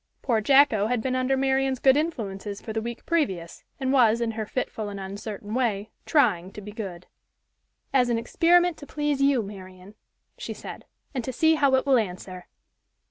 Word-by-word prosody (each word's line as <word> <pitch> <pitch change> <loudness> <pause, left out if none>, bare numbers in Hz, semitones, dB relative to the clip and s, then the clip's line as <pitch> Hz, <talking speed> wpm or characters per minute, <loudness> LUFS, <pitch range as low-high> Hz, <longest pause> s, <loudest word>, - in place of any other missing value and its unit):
Poor 230 -4 +1
Jacko 235 -4 +4
had 245 0 0
been 255 +3 -1
under 255 +1 +1
Marian's 265 0 +1
good 265 +1 +5
influences 210 -10 -3
for 220 - -7
the 220 - -1
week 235 +1 -6
previous, 190 - -1 0.2
and 265 0 0
was, 235 -4 +4
in 235 -1 -1
her 220 -1 -4
fitful 220 -4 -3
and 200 -1 -7
uncertain 205 +2 -6
way, 220 -4 -1 0.2
"trying 205 - +2
to - - -8
be 210 0 -9
good." 190 -5 -7 0.9
"As 250 -2 +3
an 235 - +1
experiment 345 +8 +3
to 285 - -11
please 295 -1 -1
you, 275 -4 +3
Marian," 185 -1 -11 0.5
she - - -5
said, - - -9 0.3
"and 255 -3 -2
to 260 - -3
see 320 +6 +3
how 280 -4 +3
it 260 - +1
will 270 -3 +4
answer." 185 -3 -6
235 Hz, 185 wpm, -25 LUFS, 205-270 Hz, 0.9 s, good